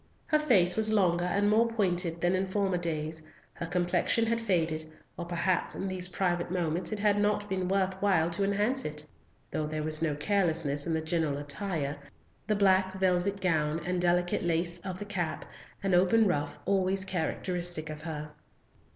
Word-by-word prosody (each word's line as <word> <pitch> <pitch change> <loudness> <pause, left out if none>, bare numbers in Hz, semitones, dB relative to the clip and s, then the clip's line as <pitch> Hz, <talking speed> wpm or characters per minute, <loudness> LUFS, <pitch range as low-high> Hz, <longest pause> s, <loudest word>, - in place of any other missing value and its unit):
Her 305 - +2
face 195 -12 +4
was 220 0 +3
longer 175 -4 +2
and 200 +3 +1
more 220 +3 +4
pointed 180 -6 -1
than 175 +1 +2
in 190 +1 0
former 190 -2 0
days, 160 -2 -3 0.3
her 170 - -6
complexion 180 +6 +1
had 230 +1 0
faded, 165 -7 0 0.3
or 175 - -5
perhaps 175 +1 -1
in 195 - -3
these 185 -1 -2
private 175 -1 -1
moments 175 0 -1
it 215 - -2
had 205 0 +2
not 205 0 +1
been 190 -2 -2
worth 190 0 +1
while 175 -5 +2
to 170 +4 0
enhance 210 +7 +2
it; 150 0 -4 0.5
though 155 - -2
there 155 0 -3
was 155 0 +1
no 155 -3 0
carelessness 160 -4 +1
in 165 - 0
the 160 - -1
general 160 -3 -1
attire, 145 0 -3 0.5
the 215 - +2
black 190 -1 +3
velvet 190 +1 +1
gown, 155 -3 +1
and 180 0 -1
delicate 175 0 +1
lace 170 +1 -1
of 185 0 -5
the 205 - -6
cap, 180 -6 -3 0.4
and 195 -1 +1
open 190 +5 +4
ruff 145 -5 -1
always 190 -1 +1
characteristic 175 -2 -2
of 150 0 -8
her. 150 -2 -6
180 Hz, 175 wpm, -29 LUFS, 165-195 Hz, 0.5 s, face